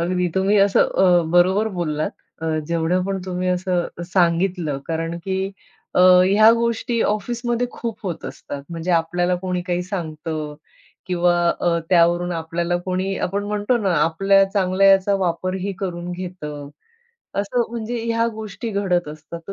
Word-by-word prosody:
अगदी 180 +1 0
तुम्ही 190 +2 +2
असं 200 0 +4
अ, 180 -2 +4
बरोबर 190 +5 +4
बोललात. 155 -3 -1 0.3
अ, - - -2 0.2
जेवढं 170 +2 0
पण 195 0 -2
तुम्ही 185 0 -2
असं 180 -1 0 0.2
अ, - - -4
सांगितलं, 170 -4 +1
कारण 165 +1 -3
की 190 -1 -1 0.6
अ, - - +4
ह्या 185 +4 +7
गोष्टी 235 0 -1
ऑफिसमध्ये 240 +3 -1
खूप 230 -3 -5
होत 180 -5 -5
असतात. 140 -1 -7
म्हणजे 170 +1 -3
आपल्याला 175 +2 0
कोणी 180 -1 -3
काही 180 -1 -1
सांगतं 160 -4 -5 0.5
किंवा 175 -1 +2 0.3
अ, 170 -1 +2
त्यावरून 175 0 +3
आपल्याला 170 +1 -2
कोणी, 185 +1 -1
आपण 200 +2 -3
म्हणतो 210 +3 0
ना, 195 -5 0
आपल्या 195 +5 +4
चांगल्याचा 195 0 +3
वापरही 185 +3 -2
करून 175 -2 -4
घेतं. 165 -6 -7 0.7
असं 205 +5 0
म्हणजे 235 0 -4
ह्या 230 0 +1
गोष्टी 220 +2 -6
घडत 185 -5 0
असतात. 155 +2 -9
तर - - -4
180 Hz, 145 wpm, -21 LUFS, 170-200 Hz, 0.7 s, ह्या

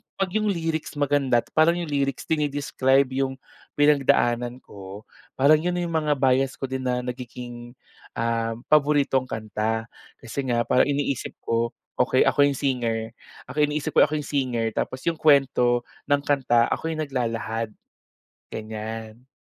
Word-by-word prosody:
'pag 195 -2 -1
yung 215 +2 0
lyrics 165 -5 -2
maganda 140 -4 +2
at - - -26
parang 160 +2 +4
yung 170 -3 -4
lyrics 140 -2 -1
dine-describe 140 -3 +1
yung 135 0 -1 0.4
pinagdaanan 125 -4 +2
ko, 100 +1 -10 0.3
parang 150 +3 +5
yun 175 +2 -1
na 175 - -1
yung 170 - -3
mga 150 -1 +1
bias 135 0 +2
ko 135 -1 -6
din 130 -1 -3
na 125 0 0
nagiging, 120 -1 -7 0.4
um, 115 0 -1
paboritong 145 -3 +3
kanta. 110 0 -2 0.4
Kasi 115 +4 -6
nga 120 -1 +1
parang 125 +4 +3
iniisip 140 -2 -2
ko, 115 0 -1 0.2
"Okey - - +4
ako 145 0 +4
yung 140 - -1
singer, 115 -4 -1 0.4
ako 130 - -9
iniisip 150 +1 +1
ko - - +6
ako 155 - -3
yung 150 - -7
singer 120 -5 0
tapos 130 +4 -3
yung 165 -1 -1
kwento 125 -5 +3 0.2
ng 145 -1 +2
kanta 125 -5 +2
ako 165 - -1
yung 155 -1 -2
naglalahad." 115 -4 -2 0.8
Ganyan. 110 +2 -7
130 Hz, 150 wpm, -24 LUFS, 120-145 Hz, 0.8 s, ko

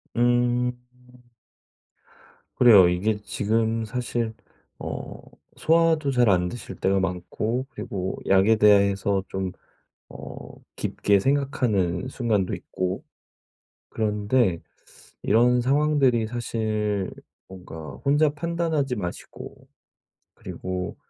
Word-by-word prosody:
음. 120 +1 +2 1.8
그래요. 105 -8 +8
이게 105 +4 0
지금 115 +2 0
사실 120 -1 -3 0.5
어 - - -6 0.4
소화도 160 -3 +2
잘 125 -3 +3
안 90 -2 +2
되실 120 - -8
때가 95 0 +1
많고 95 +7 -2
그리고 95 -1 -5
약에 95 +3 +5
대해서 100 -2 +3
좀 95 -1 -3 0.6
어 - - -9 0.4
깊게 100 -1 +1
생각하는 125 -7 0
순간도 110 -8 -1
있고. 95 0 -4 0.9
그런데 105 -3 0 0.6
이런 120 +3 +3
상황들이 135 -3 +2
사실 110 -4 -2 0.4
뭔가 80 -5 -10
혼자 145 +2 +3
판단하지 155 -4 -1
마시고 90 -4 -8 0.7
그리고 90 -1 -5
110 Hz, 195 characters per minute, -24 LUFS, 95-125 Hz, 1.8 s, 그래요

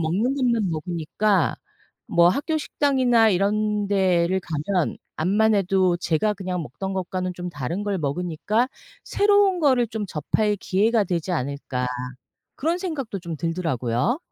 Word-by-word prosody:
먹는 195 +12 0
것만 235 -7 +1
먹으니까 170 +3 0 0.5
뭐 170 0 +5
학교 310 - 0
식당이나 255 -7 +3
이런 210 +2 +1
데를 185 -2 +2
가면 170 +2 -2 0.2
암만해도 190 0 +2
제가 175 +5 0
그냥 180 -2 -3
먹던 190 - -5
것과는 185 0 -3
좀 180 0 -5
다른 165 +6 -4
걸 200 -2 -1
먹으니까 180 - -1 0.4
'새로운 405 -2 +3
거를 260 -5 +3
좀 220 -2 -4
접할 205 +6 0
기회가 210 +3 +1
되지 175 0 -2
않을까.' 135 -3 -2 0.7
그런 325 +5 0
생각도 290 - -4
좀 170 -2 -6
들더라고요. 165 - -1
190 Hz, 290 characters per minute, -23 LUFS, 170-220 Hz, 0.7 s, 뭐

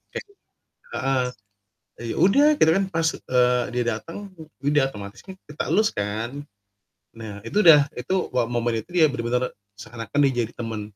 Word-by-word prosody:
kayak - - -4 0.7
heeh, 135 -2 0 0.8
eee, 120 - -5
ya - - -7
udah, 280 +11 +5
kita 160 - +5
kan 195 - +2
pas, 165 0 +1
eee, 125 -1 +2
dia 125 -1 0
dateng, 165 - -10 0.2
e - - -13 0.2
ya - - -3
udah, 150 -1 +3
otomatis 100 +2 -9
kan 190 - -8
kita 150 - -4
elus 215 +5 +4
kan. 105 +3 -3 0.9
Nah, 105 -2 -8
itu 205 - +1
udah 150 -3 +8
itu 125 +10 -2 0.2
wah 125 -2 +2
momen 120 -1 0
itu - - -48
dia 170 -3 +5
benar-benar 125 -1 -1 0.2
seakan-akan 115 +6 -5
dia - - -3
jadi 115 - -12
teman, 115 -2 -4
125 Hz, 175 wpm, -24 LUFS, 115-160 Hz, 0.9 s, udah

